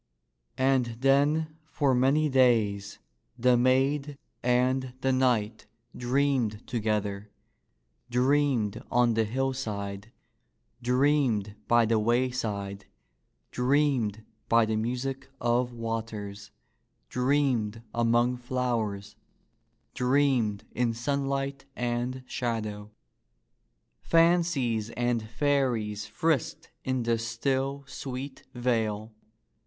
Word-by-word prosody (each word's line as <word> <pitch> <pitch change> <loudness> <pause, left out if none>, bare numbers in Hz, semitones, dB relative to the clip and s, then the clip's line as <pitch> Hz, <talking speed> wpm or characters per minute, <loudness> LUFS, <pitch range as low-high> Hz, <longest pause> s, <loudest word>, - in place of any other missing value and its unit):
And 130 -3 +1
then 150 +3 +2
for 140 -4 +1
many 135 +5 +3
days 115 -7 +2 0.4
the 125 +1 +4
maid 135 +3 +2 0.2
and 125 +1 +1
the 135 - +2
knight 120 -4 +1 0.3
dreamed 125 -4 0
together 105 -3 -2 0.4
— - - -46
dreamed 125 -3 +1
on 120 -1 +3
the 110 0 +2
hillside, 110 -5 -3 0.7
dreamed 125 -5 +2
by 120 -1 +5
the 110 0 +2
wayside, 110 -4 -1 0.6
dreamed 125 -5 +1 0.2
by 115 -1 +5
the 110 0 -1
music 125 +5 -3
of 120 +1 +1
waters, 110 -3 -5 0.6
dreamed 125 - 0
among 120 +1 +2
flowers, 115 -5 -2 0.8
dreamed 125 -5 +1
in 120 -2 0
sunlight 135 +2 -2
and 125 +1 -2
shadow. 110 -5 -3 1.1
Fan 170 +1 +5
cies 120 -10 -1
and 120 -1 +1
fairies 115 -5 0
frisked 160 -7 -1
in 130 -2 -1
the 115 0 +1
still, 135 +4 -1
sweet 135 0 -7
vale. 110 -3 -1
120 Hz, 90 wpm, -28 LUFS, 110-135 Hz, 1.1 s, by